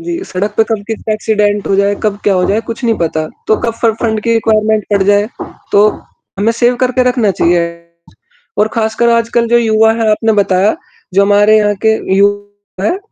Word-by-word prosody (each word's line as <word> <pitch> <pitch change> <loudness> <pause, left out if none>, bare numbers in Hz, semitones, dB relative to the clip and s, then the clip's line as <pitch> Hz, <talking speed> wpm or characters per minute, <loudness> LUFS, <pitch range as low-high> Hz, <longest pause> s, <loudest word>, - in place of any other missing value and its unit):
जी, 345 +1 -5
सड़क 205 - -4
पे 225 - +4
कब 220 -2 -3
किसका 220 0 -4
एक्सीडेंट 210 -1 0
हो 195 - +1
जाए 200 +1 +2
कब 205 -2 -1
क्या 200 - +2
हो 180 - +1
जाए 210 +3 +1
कुछ 230 +2 -6
नहीं 230 - +2
पता 160 -1 -2 0.2
तो 215 - +2
कब 230 - 0
फ - - +3
फंड 220 -2 -1
की 230 - 0
रिक्वायरमेंट 215 -1 +1
पड़ 200 -1 +2
जाए 205 +2 +2 0.4
तो 205 +1 +5 0.5
हमें 220 +3 +1
सेव 240 +1 +1
करके 255 0 +1
रखना 240 -5 +1
चाहिए। 170 -1 +1 1.0
और 210 +1 +3
ख़ासकर 225 +1 0
आजकल 230 0 +1
जो 240 +1 +4
युवा 220 -1 +3
है 220 -1 +2
आपने 220 +1 +1
बताया 195 +2 +1 0.4
जो 200 - +4
हमारे 205 +2 +4
यहाँ 210 -1 +1
के 220 - +4 0.2
युवा 205 0 -2
है 360 - 0
215 Hz, 195 wpm, -13 LUFS, 205-230 Hz, 1.0 s, तो